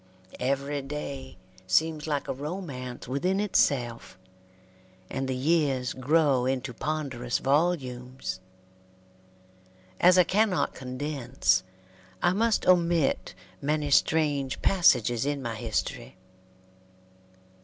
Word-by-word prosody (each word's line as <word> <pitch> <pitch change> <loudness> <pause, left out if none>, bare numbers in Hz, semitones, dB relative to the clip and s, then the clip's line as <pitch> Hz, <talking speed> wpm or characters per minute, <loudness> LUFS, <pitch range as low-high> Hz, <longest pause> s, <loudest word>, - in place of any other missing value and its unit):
Every 140 +2 -1
day 135 -3 -6 0.3
seems 155 +9 +1
like 145 -2 -1
a - - -1
romance 140 -5 -6
within 180 +10 0
itself, 125 - 0 0.9
and 135 0 -2
the 130 - -1
years 135 -3 +1
grow 135 -1 +2
into 130 -1 -2
ponderous 130 -4 -2
volumes. 130 - -1 1.6
As 180 +1 +6
I 180 - +7
cannot 200 +1 +1
condense, 130 0 -1 0.6
I 175 - +2
must 225 +2 +1
omit 170 -4 +2 0.3
many 150 0 -1
strange 145 -3 +2
passages 120 - +3
in 145 0 -1
my 120 -4 -4
history. 110 -3 -4
140 Hz, 95 wpm, -27 LUFS, 125-160 Hz, 1.6 s, I